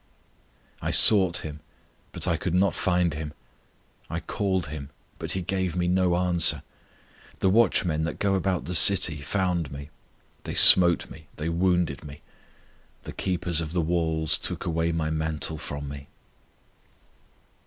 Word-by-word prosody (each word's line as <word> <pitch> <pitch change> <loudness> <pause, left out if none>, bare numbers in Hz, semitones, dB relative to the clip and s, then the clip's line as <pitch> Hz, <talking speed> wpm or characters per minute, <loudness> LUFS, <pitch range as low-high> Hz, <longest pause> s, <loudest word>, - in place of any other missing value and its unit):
I - - -3
sought 95 -7 +5
Him, 75 -1 -8 0.5
but - - -6
I 85 - +1
could 85 +2 -3
not 95 +2 +2
find 90 -3 -1
Him; 75 0 -7 0.8
I - - -4
called 95 -4 -3
Him, 70 -2 -8 0.3
but - - -4
He 95 - -4
gave 95 -1 -3
me 90 -1 -1
no 90 -1 +1
answer. 90 -2 +1 0.8
The 95 - +1
watchmen 95 -7 +1
that 85 - -5
go 100 -1 -1
about 95 -1 -2
the 90 - -5
city 85 -3 +4
found 90 -1 -2
me, 70 +2 -10 0.5
They - - -6
smote 85 -2 +7
me, 80 -1 -14
they 80 +2 -4
wounded 85 -4 -1
me; 75 -1 -12 0.8
The - - -9
keepers 90 -3 -2
of 80 0 -6
the 90 - -1
walls 80 -1 -1
took - - -5
away 85 0 -1
my 80 -1 -3
mantle 80 0 -4
from 70 -1 -7
me. 70 0 -10
85 Hz, 150 wpm, -25 LUFS, 80-90 Hz, 0.8 s, smote